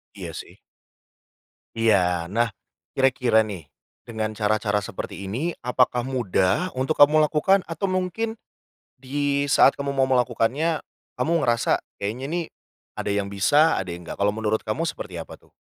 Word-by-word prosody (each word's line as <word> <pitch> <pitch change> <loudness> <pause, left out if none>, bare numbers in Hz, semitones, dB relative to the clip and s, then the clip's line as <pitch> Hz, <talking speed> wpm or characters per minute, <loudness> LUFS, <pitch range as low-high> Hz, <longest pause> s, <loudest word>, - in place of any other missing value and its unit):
Iya - - -7
sih. - - -9 1.2
Iya. 90 -7 +2
Nah, 115 +2 0 0.4
kira-kira 125 -4 +3
nih, 100 -7 -6 0.4
dengan 110 -2 -3
cara-cara 105 -1 +1
seperti 100 0 -5
ini 140 - -3
apakah 125 -1 +2
mudah 125 - +1
untuk 130 +4 +1
kamu 150 +2 +7
lakukan? 185 +6 +2
Atau 165 +4 -3
mungkin 185 +5 -2 0.6
di 140 +1 -1
saat 135 0 +5
kamu 140 0 -2
mau 135 - +3
melakukannya, 130 +5 +1 0.3
kamu 160 - -1 0.2
ngerasa 115 0 +2 0.2
kayaknya 110 +6 -4
nih 170 +2 -2 0.5
ada 100 - -2
yang 100 -1 -2
bisa 145 +11 +3
ada 95 - -4
yang 90 - -11
enggak. 85 - -8
Kalau 100 +1 +1
menurut 110 0 0
kamu 110 +10 -1
seperti 95 - -5
apa 85 - -8
tuh? - - -27
125 Hz, 145 wpm, -24 LUFS, 105-145 Hz, 1.2 s, kamu